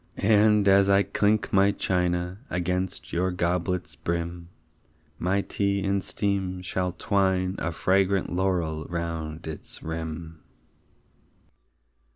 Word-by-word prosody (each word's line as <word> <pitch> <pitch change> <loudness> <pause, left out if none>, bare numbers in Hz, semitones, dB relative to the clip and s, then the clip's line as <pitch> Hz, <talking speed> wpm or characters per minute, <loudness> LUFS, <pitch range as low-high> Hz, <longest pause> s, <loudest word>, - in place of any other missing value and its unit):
And, 105 0 +4
as 100 0 +5
I 100 0 +5
clink 105 +1 +1
my 100 0 +5
china 90 -1 -1
Against 90 +1 -2
your 90 +2 +1
goblet's 90 0 -1
brim, 85 0 -4 0.7
My 95 +3 +1
tea 100 0 -1
in 100 0 +1
steam 95 -2 -2
shall 90 0 -2
twine 95 -2 +1
a 85 - -1
Fragrant 95 +2 +1
laurel 90 -4 0
round 85 -2 -4
its 80 -1 -7
rim. 80 0 -5
90 Hz, 110 wpm, -26 LUFS, 85-100 Hz, 0.7 s, as